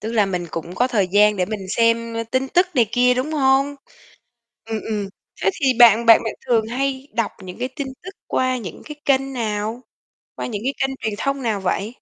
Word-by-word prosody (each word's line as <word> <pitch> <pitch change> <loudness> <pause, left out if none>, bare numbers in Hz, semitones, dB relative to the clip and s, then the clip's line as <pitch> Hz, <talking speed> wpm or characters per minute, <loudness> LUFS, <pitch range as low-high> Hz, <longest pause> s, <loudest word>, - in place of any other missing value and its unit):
Tức 220 +2 -4
là 210 -3 +3
mình 180 -2 -3
cũng 165 +2 -6
có 245 - +2
thời 200 -7 +1
gian 210 +2 +4
để 180 - +1
mình 205 -2 -5
xem, 230 +2 +1
ơ, 230 - -1
tin 260 +1 0
tức 360 +5 +3
này 235 -4 +4
kia, 250 +1 +4
đúng 260 +5 -2
hông? 275 -1 +2 0.9
Ừm, 220 -1 -3
ừm, 210 -2 -2 0.3
thế 190 - +3
thì - - +2
bạn 235 0 +7
bạn 225 -1 +7
bạn 225 - -3
thường 225 -3 +2
hay 265 +3 -2
đọc 230 -1 -1
những 180 -1 -9
cái 250 - -1
tin 280 -2 -4 0.2
tức 370 - -7 0.2
qua 255 0 0
những 195 -9 -8
cái 300 - -8
kênh 270 -1 +1
nào? 220 0 -3 0.5
Qua - - -4
những 210 -4 -4
cái 270 +3 0
kênh 270 0 -1
truyền 220 - -1
thông 275 +4 -2
nào 225 -5 -1
vậy? 190 +2 -1
230 Hz, 220 wpm, -21 LUFS, 210-265 Hz, 0.9 s, bạn